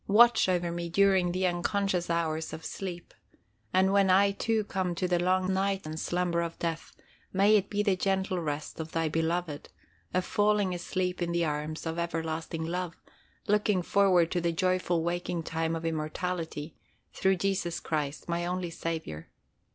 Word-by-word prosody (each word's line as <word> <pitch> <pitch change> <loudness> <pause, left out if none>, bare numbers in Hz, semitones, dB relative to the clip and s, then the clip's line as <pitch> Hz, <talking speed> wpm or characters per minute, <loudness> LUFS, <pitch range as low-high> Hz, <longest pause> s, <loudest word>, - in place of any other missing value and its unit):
Watch 235 0 +6
over 175 -2 +1
me 170 0 -4
during 190 -1 +3
the 185 +1 0
unconscious 180 0 0
hours 160 -1 -1
of 160 0 -7
sleep, 180 -3 -6 0.6
and 190 +1 +3
when 200 -1 +4
I 200 +2 +5
too 220 +2 0
come 185 -3 -2
to 180 +2 0
the 175 -1 +2
long 185 +1 +2
night 195 0 0
and 155 +1 -5
slumber 175 0 0
of 170 -1 -4
death, 165 -1 -3 0.4
may 200 +3 +5
it 200 -2 +2
be 205 0 0
the 200 -3 +3
gentle 190 -1 0
rest 150 -2 -4
of 160 0 -6
Thy 165 -1 +1
beloved, 165 -1 -2 0.4
a 185 - +1
falling 205 -1 +2
asleep 180 +1 -2
in 170 0 0
the 170 0 +2
arms 150 +1 -3
of 165 +1 -2
everlasting 165 -1 -3
love, 175 0 -3 0.5
looking 210 -3 +2
forward 180 -3 +3
to 175 - 0
the 170 0 +1
joyful 180 -1 +1
waking 175 0 -2
time 165 0 -1
of 165 0 -5
immortality, 160 0 -3 0.4
through 190 0 +2
Jesus 185 -2 -1
Christ 150 -2 -3
my 170 0 -1
only 180 0 -2
Saviour. 160 - -4
175 Hz, 165 wpm, -29 LUFS, 165-190 Hz, 0.6 s, Watch